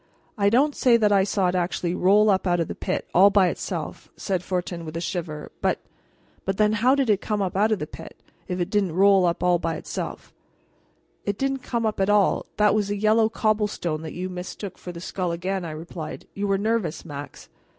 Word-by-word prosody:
"I 200 -2 +3
don't 275 +7 +3
say 240 -2 +4
that 210 -2 +2
I 195 -1 +5
saw 195 -2 +1
it - - -2
actually 175 -1 -1
roll 205 +4 +4
up 190 0 +1
out 175 -1 +2
of 165 - 0
the - - -4
pit, - - -3
all 190 +3 +7
by 195 -3 +4
itself," - - -5
said 190 -3 -1
Fortin 180 -2 -3
with 160 0 -6
a - - -2
shiver, 170 -4 -4
"but - - +1 0.7
but 195 0 -2
then, 215 0 +3
how 245 +5 +3
did 275 -2 +1
it 205 -3 +2
come 210 -2 -2
up 190 -2 -2
out 210 +3 +3
of 215 - +2
the 150 - -4
pit, 160 +1 -11 0.3
if 180 0 -3
it 175 +2 -2
didn't 195 -6 +1
roll 195 -1 +5
up 170 - -1
all 180 -1 +3
by 165 -1 -2
itself?" - - -6 0.9
"It 200 -1 -2
didn't 270 +1 -1
come 235 -2 -2
up 215 -2 -1
at 195 +1 +2
all; 205 -1 +3
that 210 -1 +4
was 205 -2 0
a 205 - -1
yellow 220 +2 +3
cobblestone 210 -8 -1
that 160 - -7
you 180 +2 -3
mistook 180 +1 -7
for 180 - -7
the 170 - -9
skull 180 -1 -3
again," 185 +3 -2
I 170 - -5
replied. 155 +1 -7
"You 205 0 -2
were 195 0 +2
nervous, 215 -6 -1
Max." 145 -2 -8
195 Hz, 225 wpm, -24 LUFS, 175-210 Hz, 0.9 s, all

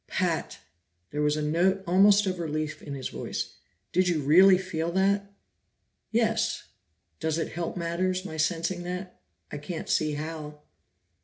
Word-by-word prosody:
"Pat!" - - -1 0.5
There 150 - -2
was 150 0 +2
a 150 - -1
note 180 +6 +2
almost 200 +3 +5
of 185 -2 -2
relief 155 -2 -3
in 145 -2 -6
his 130 -2 -4
voice. - - -5 0.3
"Did 185 0 +3
you 165 -5 +1
really 185 +6 +7
feel 170 -3 -3
that?" 200 +1 +1 0.8
"Yes. 225 -1 +1 0.6
Does 160 0 0
it 165 - -2
help 170 +1 -4
matters, 180 +2 -1
my 160 - -6
sensing 170 +3 0
that? 180 +1 -6 0.3
I 150 - -5
can't 160 +2 -6
see 155 -1 +2
how." 150 0 -6
170 Hz, 150 wpm, -27 LUFS, 155-185 Hz, 0.8 s, really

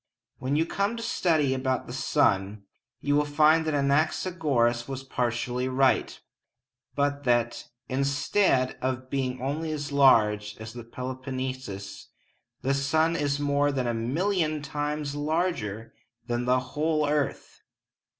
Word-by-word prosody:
When 130 +2 -1
you 160 +2 +2
come 200 +6 -1
to 230 - -5
study 160 - +1
about 130 -1 -1
the 120 - -8
sun, 100 -5 +1 0.4
you 145 0 +1
will 150 - +4
find 155 +2 +4
that 155 - +1
Anaxagoras 140 -4 +1
was 135 -1 -5
partly 125 0 -1
right, 130 0 +2 0.8
but 145 0 0
that, 120 -1 +1 0.2
instead 140 +1 +1
of 130 0 -3
being 130 -2 -1
only 150 +5 -2
as 145 -2 -4
large 105 -7 +4
as 110 0 -8
the 120 -1 -8
Peloponnesus, 130 -5 -6 0.6
the 135 +1 +2
sun 155 +4 +2
is 145 -2 0
more 145 0 +2
than 130 -2 -1
a 120 - 0
million 155 - 0
times 150 0 -3
larger 145 - -2 0.3
than 120 0 -2
the 125 +1 +3
whole 155 0 +1
earth! 145 -1 -2
135 Hz, 130 wpm, -27 LUFS, 125-150 Hz, 0.8 s, will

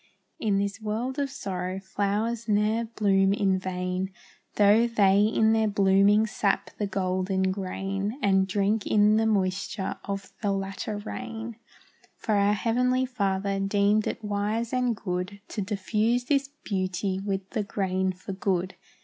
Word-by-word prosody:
In 205 -3 +1
this 200 +2 -2
world 230 +6 -2
of 280 -1 0
sorrow 190 -8 -4
flowers 210 +4 -2
ne'er 215 +2 +2
bloom 195 -3 +2
in 195 -2 +1
vain, 185 0 -3 0.4
Though 210 +3 +5
they 200 -4 +4
in 220 0 +3
their 220 -1 +2
blooming 200 +1 +4
sap 205 -2 -1
the 205 - 0
golden 190 0 0
grain, 195 +3 -3
And 190 -5 +3
drink 200 +2 0
in 210 0 +4
the 225 0 +2
moisture 190 -1 -1
of 195 0 -5
the 205 -3 +1
latter 195 +2 -3
rain; 225 +2 -6 0.6
For 220 - -2
our 200 0 +3
Heavenly 250 +5 +1
Father 200 -5 -1
deemed 200 +2 +2
it - - -4
wise 210 +3 -1
and 250 -2 +1
good 185 0 -4
To 210 - -3
diffuse 215 +4 0
this 275 0 +1 0.2
beauty 190 -1 -1
with 195 -1 -3
the 220 - -1
grain 190 -2 -1
for 185 +1 -8
food. 190 -1 -1
200 Hz, 145 wpm, -27 LUFS, 190-220 Hz, 0.6 s, Though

